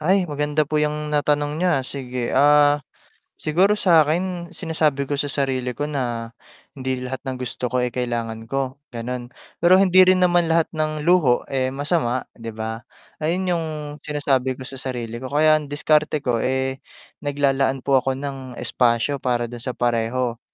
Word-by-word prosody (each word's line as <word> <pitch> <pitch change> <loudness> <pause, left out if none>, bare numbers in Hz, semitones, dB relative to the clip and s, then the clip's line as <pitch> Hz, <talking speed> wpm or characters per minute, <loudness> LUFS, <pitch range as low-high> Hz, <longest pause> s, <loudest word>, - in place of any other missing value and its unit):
Ay, 180 +2 +2
maganda 150 +1 0
po 150 +1 -1
yung 150 0 -1
natanong 145 0 +1
niyo, 180 +1 +2
ah, 135 - 0
sige. 125 -2 -4
Ah, 145 +1 +5 0.6
siguro 185 +7 +2
sa’kin 175 -1 +2
sinasabi 155 -4 0
ko 145 - 0
sa 145 - -1
sarili 130 -4 -2
ko 145 - -3
na 120 -4 -3 0.4
hindi 130 -1 -3
lahat 130 +1 -4
ng 130 - -2
gusto 125 0 -4
ko, 125 +1 0
eh, 125 - -1
kailangan 115 -2 -3
ko 135 +1 -3 0.2
ganun. 120 +1 -4 0.3
Pero 175 +2 +6
hindi 185 -1 +5
rin 185 0 +5
naman 175 -1 +3
lahat 165 0 +2
ng 155 -1 -2
luho, 170 -8 +4
eh, 130 -1 +1
masama 135 -2 -1
‘di 115 -1 -11
ba. 110 +1 -4 0.4
Ayun 180 +4 0
yung 165 -2 0 0.3
sinasabi 135 -3 0
ko 130 - -9
sa 130 0 -9
sarili 120 -3 -5
ko. 130 - -6
Kaya 155 +3 +4
ang 150 - -8
diskarte 150 0 +1
ko 120 -2 +1
eh, 130 +2 -1 0.4
naglalaan 135 -2 0
po 135 -1 +4
ako 130 +1 -1
ng 135 -2 -6
espasyo 120 +4 +1
para 120 -2 -1
dun 120 - -7
sa 125 +1 -5
pareho, 120 0 0
135 Hz, 170 wpm, -22 LUFS, 125-155 Hz, 0.6 s, Pero